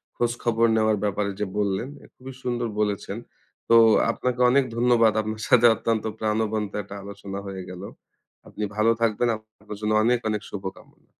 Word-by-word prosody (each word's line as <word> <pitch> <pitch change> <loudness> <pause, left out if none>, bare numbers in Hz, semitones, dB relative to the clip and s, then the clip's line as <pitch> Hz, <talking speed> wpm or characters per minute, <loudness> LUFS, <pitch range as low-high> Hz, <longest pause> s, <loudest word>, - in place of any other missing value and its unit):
খোঁজ 120 -1 0
খবর 115 -1 +2
নেওয়ার 110 -1 +2
ব্যাপারে 100 0 -1
যে 105 - 0
বললেন, 100 +3 0 0.3
খুবই 130 +1 -10
সুন্দর 120 -1 -1
বলেছেন। 105 0 -1 0.5
তো 115 - +6 0.4
আপনাকে 125 +1 -2
অনেক 135 +2 +4
ধন্যবাদ। 120 -2 +4
আপনার 110 0 -5
সাথে 120 -1 +6
অত্যন্ত 115 -2 -1 0.2
প্রাণবন্ত 110 -1 -1
একটা 100 +1 -10
আলোচনা 100 -1 -8
হয়ে 95 -1 -6
গেল। 90 0 -8 0.7
আপনি 105 - -6
ভালো 110 +2 +3
থাকবেন, 115 +1 +1
আপনার 110 -1 -12
জন্য 105 0 0
অনেক 120 +1 +3
অনেক 105 -1 -1
শুভকামনা। 95 -1 -9
110 Hz, 155 wpm, -24 LUFS, 105-115 Hz, 0.7 s, তো